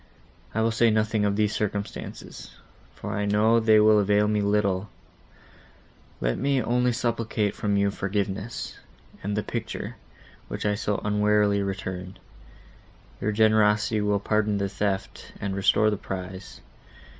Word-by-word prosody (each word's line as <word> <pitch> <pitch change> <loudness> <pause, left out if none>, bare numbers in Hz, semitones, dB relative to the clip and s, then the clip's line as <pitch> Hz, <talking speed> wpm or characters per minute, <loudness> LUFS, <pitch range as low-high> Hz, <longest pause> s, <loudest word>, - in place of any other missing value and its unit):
I 110 - +2
will 115 - +2
say 115 +1 +3
nothing 110 -1 +1
of 100 -1 +1
these 105 0 +1
circumstances, 105 -1 -5 0.4
for - - -6
I 105 - -1
know 105 +3 +3
they 110 -1 +5
will 105 0 +6
avail 105 +1 +3
me 105 0 +1
little; 100 -1 +1 1.3
let - - -1
me 140 -1 +1
only 125 +1 +1
supplicate 115 -3 -1
from 100 -1 -1
you 100 0 +2
forgiveness, 100 +2 -3 0.4
and 100 +2 -3
the 105 - 0
picture, - - -5 0.5
which - - -5
I 105 - +2
so 105 0 -1
unwarily 105 -1 +2
returned. 95 -1 -5 1.0
Your 105 - 0
generosity 110 0 +3
will 105 -1 +1
pardon 105 0 +1
the 100 0 -1
theft, 100 0 -3
and 100 -1 -3
restore 100 +2 +3
the 105 - -1
prize. 95 -1 -7
105 Hz, 140 wpm, -26 LUFS, 100-110 Hz, 1.3 s, will